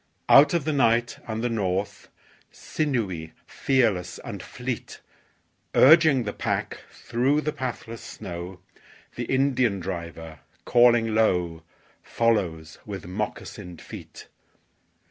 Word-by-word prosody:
Out 145 +5 +7
of 165 -5 0
the 155 - 0
night 120 -3 +2
and 110 0 -3
the - - +2
north, 100 -3 -2 0.4
Sinewy, 105 - -3
fearless 115 -10 0
and - - -6
fleet, - - -6 0.8
Urging 155 -2 +6
the 105 - -4
pack - - -3
through 135 +6 0
the 150 0 -2
pathless 115 -3 -5
snow, 90 +1 -8 0.5
The - - -3
Indian 130 -6 +1
driver, 85 -3 -6 0.3
calling 120 -2 +4
low, 90 -7 +1 0.4
Follows 90 -9 -1
with 100 -5 -7
moccasined 90 -1 -6
feet. - - -11
115 Hz, 105 wpm, -25 LUFS, 90-130 Hz, 0.8 s, Out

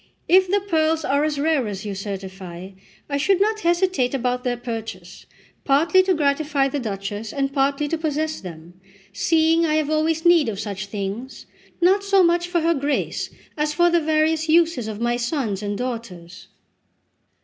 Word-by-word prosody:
If 370 +1 +5
the 405 +1 +2
pearls 320 -4 0
are 280 +2 +1
as 305 -1 -1
rare 295 -5 +1
as 200 -1 -6
you 205 - -3
certify, 190 -2 -7 0.4
I 280 - -1
should 365 +6 +2
not 430 +2 +1
hesitate 345 -8 +1
about 250 -1 -1
their 245 -1 -1
purchase, 225 -7 -7 0.4
partly 325 +7 +4
to 375 -1 +1
gratify 285 -2 +1
the 285 - -3
Duchess, 205 -1 -5
and 275 -1 -2
partly 280 +1 +1
to 330 +2 -2
possess 310 0 -2
them, 175 0 -11 0.3
seeing 325 +8 +2
I 310 -2 +1
have 310 -1 0
always 315 +1 0
need 340 -7 +5
of 200 -3 -5
such 205 -1 -5
things, 205 +5 -6 0.4
not 385 +3 +4
so 395 -1 +4
much 345 0 +2
for 350 -1 0
her 335 +1 +2
Grace, 285 -1 -2 0.3
as 300 0 -1
for 345 0 +4
the 340 -1 +3
various 315 +1 +1
uses 325 -7 +3
of 215 -1 -5
my 240 +1 0
sons 240 - -2
and 205 -1 -3
daughters." 215 -8 -6
280 Hz, 170 wpm, -22 LUFS, 215-325 Hz, 0.4 s, If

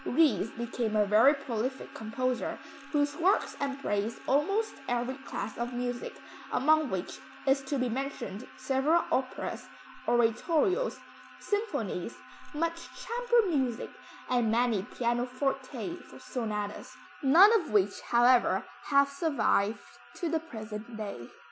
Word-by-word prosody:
Ries 250 - +3
became 230 -1 -3
a 210 -1 +4
very 220 +8 +6
prolific 260 -1 -4
composer, 245 +3 -2 0.3
whose 290 -1 +1
works 370 +4 +2
embrace 235 -6 -2
almost 395 +11 +1 0.2
every 245 +1 0
class 265 -5 -6
of 240 +1 -2
music, 245 0 -4 0.3
among 310 +2 +3
which 190 -3 -4 0.3
is 270 0 +3
to 280 +1 -1
be 255 -1 +1
mentioned 250 -4 -4
several 280 +6 +2
operas, 260 0 -2 0.4
oratorios, 305 - +2 0.4
symphonies, 415 +2 -2 0.4
much 335 +2 -2
chamber 475 -1 +1
music, 255 -5 -1 0.4
and 245 -3 +2
many 230 -2 +2
pianoforte 255 - -2 0.2
sonatas, 210 -4 -4 0.3
none 345 +11 +7
of 330 - -9
which, 205 -1 +2
however 240 +1 +4 0.2
have 280 -1 +4
survived 280 -8 +1 0.3
to 345 - -2
the 325 0 +1
present 220 -6 -8
day. 200 - -6
255 Hz, 115 wpm, -30 LUFS, 225-295 Hz, 0.4 s, none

